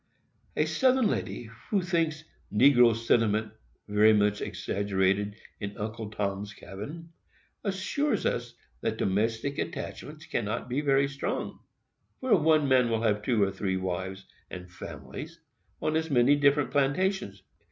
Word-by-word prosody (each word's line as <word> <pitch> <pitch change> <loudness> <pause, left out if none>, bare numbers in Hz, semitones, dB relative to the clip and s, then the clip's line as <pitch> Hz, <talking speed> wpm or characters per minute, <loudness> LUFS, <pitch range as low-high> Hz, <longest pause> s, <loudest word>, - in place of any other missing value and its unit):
A - - +3
Southern 260 -2 +3
lady, 120 - -2 0.2
who 200 -4 +1
thinks 165 -3 0 0.3
"negro 120 0 +6
sentiment" 110 -2 +1 0.4
very 105 +1 +5
much 105 0 +2
exaggerated 100 0 0 0.2
in 100 0 -5
"Uncle 110 +1 -5
Tom's 105 0 -3
Cabin," 150 +13 -8 0.5
assures 210 +9 -1
us - - -1 0.3
that - - -1
domestic 115 +8 0
attachments 150 +2 -5
cannot 115 +1 -2
be 130 +4 -1
very 140 -1 +3
strong, 140 0 -4 0.6
where 255 -3 +3
one 155 -2 +3
man 130 -3 +4
will 115 0 0
have 105 -2 +2
two 110 -2 +2
or 95 - +1
three 95 -1 -2
wives 95 +1 -4 0.2
and 90 0 -9
families, 85 - -8 0.4
on 155 0 +1
as 160 0 0
many 130 +1 +5
different 145 0 +3
plantations. 145 - 0
115 Hz, 130 wpm, -28 LUFS, 105-150 Hz, 0.6 s, negro